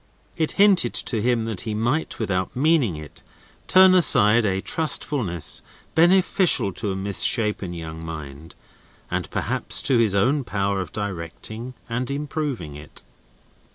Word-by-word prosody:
It 160 Hz, -, -2 dB
hinted 195 Hz, -, +3 dB
to 115 Hz, -4 st, -1 dB
him 120 Hz, -1 st, 0 dB
that 110 Hz, -5 st, -4 dB
he 110 Hz, -2 st, -4 dB
might, 120 Hz, +9 st, -2 dB
without 95 Hz, -4 st, -3 dB
meaning 140 Hz, -, +2 dB
it, 75 Hz, -1 st, -11 dB, 0.5 s
turn 185 Hz, 0 st, +6 dB
aside 115 Hz, -, +5 dB
a 95 Hz, -2 st, 0 dB
trustfulness 110 Hz, -, +1 dB, 0.3 s
beneficial 175 Hz, -, +3 dB
to 105 Hz, 0 st, -4 dB
a -, -, -4 dB
mis 95 Hz, +1 st, -1 dB
shapen 105 Hz, -5 st, +1 dB
young 80 Hz, -1 st, -8 dB
mind 80 Hz, -1 st, -9 dB, 0.6 s
and -, -, -3 dB
perhaps -, -, -1 dB
to 130 Hz, -3 st, +2 dB
his 110 Hz, -4 st, +2 dB
own 130 Hz, +8 st, +1 dB
power 100 Hz, -3 st, -2 dB
of 90 Hz, -, -8 dB
directing 105 Hz, +5 st, -6 dB
and 120 Hz, +2 st, -3 dB
improving 140 Hz, -, -4 dB
it. 75 Hz, +1 st, -10 dB
110 Hz, 140 wpm, -22 LUFS, 95-140 Hz, 0.6 s, turn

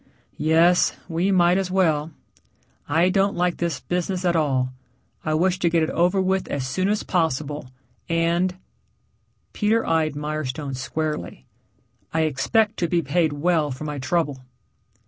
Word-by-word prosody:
"Yes, 165 Hz, +3 st, +4 dB
we 175 Hz, +2 st, 0 dB
might 180 Hz, 0 st, +4 dB
as 190 Hz, -1 st, -2 dB
well. 160 Hz, -5 st, +1 dB, 0.8 s
I 165 Hz, +5 st, +3 dB
don't 195 Hz, +1 st, +2 dB
like 175 Hz, 0 st, 0 dB
this 170 Hz, -6 st, -2 dB
business 180 Hz, +1 st, -2 dB
at 175 Hz, -1 st, +2 dB
all. 130 Hz, -5 st, +1 dB, 0.5 s
I 155 Hz, -1 st, 0 dB
wish 185 Hz, +3 st, +1 dB
to 175 Hz, -, +2 dB
get 165 Hz, -1 st, +2 dB
it 160 Hz, -, -1 dB
over 180 Hz, +3 st, +2 dB
with 190 Hz, 0 st, 0 dB
as 135 Hz, -2 st, -3 dB
soon 185 Hz, +9 st, 0 dB
as 210 Hz, 0 st, 0 dB
possible, 150 Hz, -5 st, -1 dB, 0.4 s
and 170 Hz, +2 st, +1 dB, 0.5 s
" -, -, -44 dB
Peter 225 Hz, +2 st, +1 dB
eyed 160 Hz, -2 st, +1 dB
Mirestone 150 Hz, -2 st, -4 dB
squarely. 135 Hz, -, -4 dB, 0.7 s
"I 160 Hz, -, +1 dB
expect 210 Hz, -, +1 dB
to 170 Hz, -, 0 dB
be 170 Hz, 0 st, +1 dB
paid 160 Hz, +2 st, +1 dB
well 155 Hz, 0 st, +1 dB
for 130 Hz, +2 st, -6 dB
my 150 Hz, -2 st, -4 dB
trouble." 145 Hz, -1 st, -1 dB
165 Hz, 150 wpm, -23 LUFS, 150-180 Hz, 0.8 s, Yes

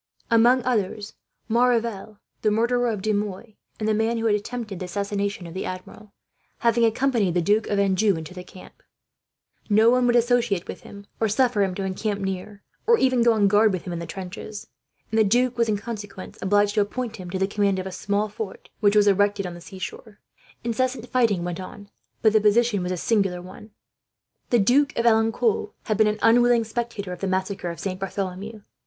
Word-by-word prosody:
Among 240 Hz, +2 st, +5 dB
others, 210 Hz, -4 st, -1 dB, 0.3 s
Maurevel, 230 Hz, -3 st, 0 dB, 0.2 s
the 215 Hz, -, +2 dB
murderer 240 Hz, +3 st, +1 dB
of 210 Hz, -4 st, -3 dB
De 215 Hz, 0 st, +1 dB
Mouy, 205 Hz, +2 st, -4 dB, 0.2 s
and 215 Hz, -, -2 dB
the 220 Hz, -, +2 dB
man 225 Hz, +2 st, 0 dB
who 225 Hz, -, -2 dB
had 220 Hz, -, +3 dB
attempted 210 Hz, -2 st, -4 dB
the 185 Hz, -, -4 dB
assassination 200 Hz, 0 st, -3 dB
of 165 Hz, -, -9 dB
the 190 Hz, -, -4 dB
Admiral, 185 Hz, +3 st, -8 dB, 0.5 s
having 235 Hz, 0 st, +2 dB
accompanied 225 Hz, -6 st, +1 dB
the -, -, +3 dB
Duke 210 Hz, +5 st, +2 dB
of 205 Hz, -, 0 dB
Anjou 195 Hz, -1 st, +2 dB
to 160 Hz, -, -10 dB
the 180 Hz, -1 st, -8 dB
camp, 185 Hz, -, -15 dB, 0.9 s
no 220 Hz, +3 st, +5 dB
one 250 Hz, 0 st, +3 dB
would 240 Hz, -, +3 dB
associate 240 Hz, -5 st, +2 dB
with -, -, -7 dB
him 200 Hz, 0 st, -12 dB
or 220 Hz, -, +1 dB
suffer 240 Hz, -1 st, +2 dB
him 190 Hz, -2 st, 0 dB
to 195 Hz, -, -3 dB
encamp 200 Hz, +2 st, -2 dB
near, 195 Hz, +1 st, -5 dB, 0.2 s
or 465 Hz, 0 st, +6 dB
even 255 Hz, -, +2 dB
go 235 Hz, 0 st, +5 dB
on 210 Hz, -2 st, +3 dB
guard 210 Hz, +2 st, +4 dB
with 185 Hz, -2 st, -3 dB
him 180 Hz, -, -5 dB
into 170 Hz, 0 st, -5 dB
the -, -, -24 dB
trenches; 195 Hz, +2 st, -7 dB, 0.5 s
and 225 Hz, -, +2 dB
the -, -, +6 dB
duke 245 Hz, +4 st, +2 dB
was, 230 Hz, -2 st, +1 dB
in 210 Hz, -, +1 dB
consequence, 205 Hz, -3 st, -8 dB
obliged 205 Hz, +1 st, +2 dB
to 210 Hz, -, +3 dB
appoint 225 Hz, +2 st, -3 dB
him 180 Hz, -2 st, -8 dB
to 190 Hz, -, -3 dB
the 190 Hz, -, +1 dB
command 200 Hz, -1 st, 0 dB
of 185 Hz, -, -3 dB
a 190 Hz, -, -5 dB
small 200 Hz, +3 st, -1 dB
fort 210 Hz, -1 st, -8 dB
which 205 Hz, -1 st, +3 dB
was 210 Hz, -1 st, +5 dB
erected 205 Hz, 0 st, +2 dB
on 180 Hz, -, -5 dB
the 175 Hz, -, -11 dB
seashore. 195 Hz, +3 st, -9 dB, 0.4 s
Incessant 245 Hz, +1 st, -1 dB
fighting 225 Hz, -8 st, +2 dB
went 175 Hz, 0 st, -4 dB
on, 200 Hz, +2 st, -10 dB, 0.3 s
but 220 Hz, -1 st, +5 dB
the 215 Hz, -, +4 dB
position 215 Hz, 0 st, +3 dB
was 180 Hz, 0 st, -3 dB
a 180 Hz, -, -2 dB
singular 195 Hz, -2 st, +1 dB
one. 185 Hz, +4 st, -12 dB, 0.8 s
The 240 Hz, -, +4 dB
Duke 255 Hz, +7 st, +3 dB
of 235 Hz, -, 0 dB
Alencon 225 Hz, 0 st, +2 dB
had 215 Hz, -, -1 dB
been 220 Hz, 0 st, +4 dB
an 210 Hz, 0 st, 0 dB
unwilling 240 Hz, 0 st, +5 dB
spectator 220 Hz, -4 st, -4 dB
of 180 Hz, -, -9 dB
the 195 Hz, -, -2 dB
massacre 190 Hz, -1 st, -2 dB
of 170 Hz, -, -7 dB
Saint 185 Hz, -1 st, -4 dB
Bartholomew. 195 Hz, +2 st, -5 dB
210 Hz, 205 wpm, -24 LUFS, 195-230 Hz, 0.9 s, or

